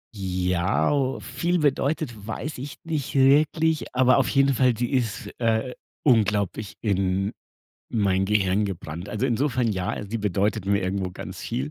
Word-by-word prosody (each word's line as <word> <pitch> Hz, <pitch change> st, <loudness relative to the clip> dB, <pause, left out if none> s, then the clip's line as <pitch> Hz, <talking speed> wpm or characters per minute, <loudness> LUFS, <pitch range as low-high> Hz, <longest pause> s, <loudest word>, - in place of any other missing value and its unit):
Ja, 90 Hz, -, 0 dB
o 135 Hz, -2 st, 0 dB
viel 175 Hz, +1 st, -1 dB
bedeutet, 140 Hz, -6 st, -1 dB
weiß 140 Hz, +5 st, -5 dB
ich 140 Hz, +2 st, -6 dB
nicht 155 Hz, -5 st, -3 dB
wirklich, 150 Hz, +2 st, +3 dB
aber 130 Hz, 0 st, +5 dB
auf 135 Hz, -, +1 dB
jeden 135 Hz, 0 st, +3 dB
Fall, 125 Hz, -2 st, +2 dB
sie 120 Hz, +3 st, -1 dB
ist 120 Hz, -6 st, -1 dB
äh, 115 Hz, +2 st, 0 dB, 0.3 s
unglaublich 105 Hz, -, +1 dB
in 95 Hz, -1 st, 0 dB, 0.6 s
mein 95 Hz, -4 st, +1 dB
Gehirn 100 Hz, 0 st, +2 dB
gebrannt. 85 Hz, -2 st, -6 dB
Also 110 Hz, +4 st, -2 dB
insofern 125 Hz, -1 st, +1 dB
ja, 95 Hz, -1 st, -2 dB
sie 115 Hz, -, -2 dB
bedeutet 105 Hz, 0 st, 0 dB
mir 100 Hz, 0 st, +2 dB
irgendwo 95 Hz, 0 st, -2 dB
ganz -, -, -8 dB
viel. 70 Hz, +3 st, -3 dB
110 Hz, 150 wpm, -25 LUFS, 95-135 Hz, 0.6 s, aber